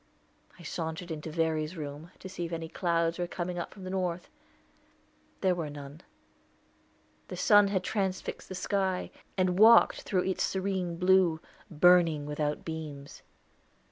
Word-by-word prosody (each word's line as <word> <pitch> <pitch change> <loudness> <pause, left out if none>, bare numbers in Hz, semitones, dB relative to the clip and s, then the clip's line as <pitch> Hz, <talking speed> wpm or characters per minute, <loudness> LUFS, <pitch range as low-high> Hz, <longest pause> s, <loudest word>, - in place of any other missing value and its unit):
I 175 - -13
sauntered 170 +1 -5
into 155 0 -5
Verry's 160 +1 -1
room, 150 +2 -7
to - - -9
see 180 -2 -5
if 165 - -7
any 165 -1 -4
clouds 170 0 0
were 175 - -1
coming 175 0 -4
up 170 - -5
from 195 - -12
the 185 - -5
north. 180 -2 -2 1.1
There 185 -2 +3
were 165 -4 -3
none. 145 +2 -9 1.3
The - - -7
sun 205 -2 +6
had 190 -2 -1
transfixed 190 -2 -3
the 190 - -5
sky, 190 0 -1 0.3
and 185 0 +1
walked 225 +2 +7
through 185 -2 0
its 190 -1 -2
serene 190 -3 -2
blue, 180 -2 +4 0.3
"burning 165 -2 +4
without 150 0 -2
beams." 150 -3 -7
175 Hz, 145 wpm, -29 LUFS, 160-185 Hz, 1.3 s, walked